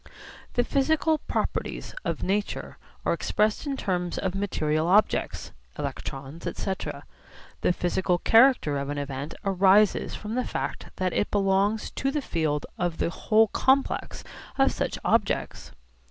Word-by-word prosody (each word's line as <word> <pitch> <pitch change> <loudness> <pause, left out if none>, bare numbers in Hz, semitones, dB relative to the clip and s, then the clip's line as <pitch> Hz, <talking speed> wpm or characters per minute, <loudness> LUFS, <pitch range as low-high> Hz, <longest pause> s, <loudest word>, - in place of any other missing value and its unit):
The 245 - +2
physical 310 +4 +2
properties - - -3
of - - -2
nature 205 +2 -2 0.3
are - - +3
expressed 215 +6 0
in 275 -1 -2
terms 180 -6 -2
of 185 -2 -1
material 160 -5 0
objects 205 +4 +2 0.3
(electrons, 135 +4 -5
etc.). 190 -1 -4 0.6
The - - +3
physical 180 0 0
character 225 - +4
of 140 0 -4
an 145 - -3
event 140 +2 -4
arises 195 +1 +4
from 215 +1 -6
the 255 +1 0
fact - - -4
that 185 -1 -1
it - - 0
belongs 200 +2 +1
to 270 - -1
the 290 0 -2
field 155 - -1
of 175 -2 -1
the - - 0
whole 220 +5 +3
complex 270 +1 +1 0.3
of 270 0 +4
such - - -2
objects. - - 0
195 Hz, 140 wpm, -26 LUFS, 170-225 Hz, 0.6 s, character